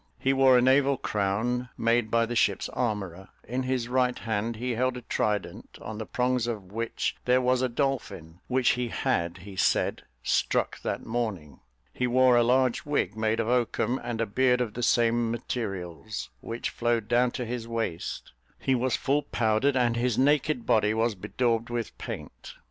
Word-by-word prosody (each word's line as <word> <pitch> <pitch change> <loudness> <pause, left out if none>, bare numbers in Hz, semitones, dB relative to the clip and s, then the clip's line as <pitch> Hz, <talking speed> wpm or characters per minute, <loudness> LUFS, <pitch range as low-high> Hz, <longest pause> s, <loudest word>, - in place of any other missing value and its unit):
He 135 - +1
wore 135 -1 +6
a 125 - +4
naval 135 +1 +4
crown, 110 +6 -1
made 115 -1 +2
by 115 +1 +3
the 120 +1 -4
ship's - - +1
armourer; 95 -6 -3 0.2
in 125 +4 -2
his 130 -2 -1
right 125 0 +1
hand 110 +1 -2
he 125 +3 -3
held 125 +2 0
a 125 - -8
trident, 105 -3 -2
on 110 -1 -7
the 110 - -5
prongs 125 -1 0
of 105 -6 -5
which 115 +2 -2
there 125 0 +4
was 130 0 +2
a 130 - +1
dolphin, 120 - -3
which 130 -1 +2
he 125 -1 +1
had, 85 -5 -1
he 100 -2 -9
said, 90 - +1 0.2
struck - - 0
that - - -3
morning; 110 -10 -3 0.3
he 125 - 0
wore 130 0 +5
a 120 - +5
large 125 +1 +2
wig, 140 -9 -1
made 110 0 0
of 115 - 0
oakum, 125 +1 +1
and 120 -2 -4
a 115 - +1
beard 125 +4 +2
of 120 -4 -2
the 120 - -5
same 120 0 +2
materials, 105 -4 -4
which 115 +1 -4
flowed 120 -2 0
down 120 +1 +3
to 125 0 -4
his 120 0 -4
waist; 115 -8 -4 0.3
he 135 - 0
was 130 0 +1
full 145 +2 +1
powdered, 125 0 +1
and 120 -2 +2
his 120 -1 0
naked 145 -2 +2
body 110 0 +3
was 115 0 +1
bedaubed 115 +4 -1
with 120 -1 -3
paint. - - -8
120 Hz, 180 wpm, -27 LUFS, 110-125 Hz, 0.3 s, wore